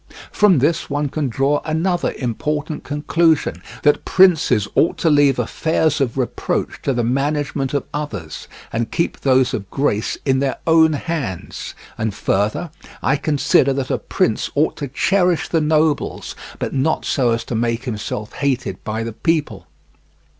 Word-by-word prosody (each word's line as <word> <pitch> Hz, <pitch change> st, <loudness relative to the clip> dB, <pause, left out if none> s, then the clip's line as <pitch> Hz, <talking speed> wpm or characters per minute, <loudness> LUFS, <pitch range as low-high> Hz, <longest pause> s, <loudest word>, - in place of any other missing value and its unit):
From 205 Hz, -5 st, +4 dB
this 160 Hz, +6 st, +1 dB
one 145 Hz, 0 st, -1 dB
can 145 Hz, -1 st, -2 dB
draw 135 Hz, +5 st, +1 dB
another 170 Hz, +3 st, 0 dB
important 150 Hz, +5 st, -3 dB
conclusion, 155 Hz, +2 st, +1 dB, 0.2 s
that 145 Hz, -, +3 dB
princes 160 Hz, -, +4 dB
ought 165 Hz, -, +2 dB
to 165 Hz, -, +2 dB
leave 145 Hz, -2 st, +4 dB
affairs 155 Hz, +5 st, 0 dB
of 130 Hz, -1 st, -1 dB
reproach 130 Hz, -2 st, -2 dB
to -, -, 0 dB
the 120 Hz, -2 st, 0 dB
management 140 Hz, +2 st, -1 dB
of 140 Hz, -, 0 dB
others, 105 Hz, -, -5 dB, 0.3 s
and 115 Hz, 0 st, -1 dB
keep 170 Hz, -, -1 dB
those 130 Hz, -2 st, +3 dB
of 100 Hz, -2 st, -4 dB
grace 110 Hz, -6 st, -1 dB
in 130 Hz, -2 st, +2 dB
their 135 Hz, -1 st, -1 dB
own 160 Hz, -1 st, +5 dB
hands. 140 Hz, -, -4 dB, 0.2 s
And 110 Hz, -2 st, -1 dB
further, 105 Hz, -, -1 dB, 0.3 s
I 135 Hz, -, +3 dB
consider 140 Hz, -2 st, +2 dB
that 135 Hz, -1 st, -3 dB
a -, -, 0 dB
prince 110 Hz, -, 0 dB
ought 150 Hz, +2 st, +2 dB
to 145 Hz, -, -4 dB
cherish 180 Hz, +5 st, +1 dB
the 165 Hz, -, +2 dB
nobles, 155 Hz, -1 st, 0 dB, 0.2 s
but -, -, -4 dB
not 140 Hz, +4 st, 0 dB
so 130 Hz, -4 st, +1 dB
as 115 Hz, 0 st, 0 dB
to -, -, -6 dB
make 115 Hz, +1 st, -1 dB
himself 110 Hz, -3 st, -5 dB
hated 130 Hz, -9 st, -2 dB
by 110 Hz, +1 st, -3 dB
the 115 Hz, -1 st, -5 dB
people. 160 Hz, +6 st, -1 dB
140 Hz, 155 wpm, -20 LUFS, 120-155 Hz, 0.3 s, own